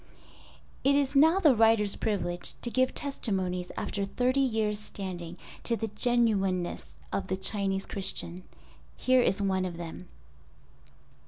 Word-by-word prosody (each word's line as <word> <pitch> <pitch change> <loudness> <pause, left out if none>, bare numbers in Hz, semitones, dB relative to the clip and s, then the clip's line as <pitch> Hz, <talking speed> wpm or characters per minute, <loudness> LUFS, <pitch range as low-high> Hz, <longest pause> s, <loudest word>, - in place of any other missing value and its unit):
It 280 +1 +4
is 280 0 +1
now 320 +6 +6
the 310 -8 +6
writer's 220 -2 +4
privilege 175 -5 -2
to 240 - 0
give 255 +1 +1
testimonies 190 -10 -2
after 200 - -2
thirty 250 +7 0
years 220 -5 +1
standing, 180 -5 -6 0.3
to 235 - +1
the 225 0 -3
genuineness 210 -6 +1 0.2
of - - -2
the 190 - -1
Chinese 195 0 0
Christian—here 195 +7 -2
is 200 -4 +1
one 190 -1 +1
of 175 -2 -4
them. 170 +1 -8
205 Hz, 130 wpm, -29 LUFS, 185-245 Hz, 0.3 s, now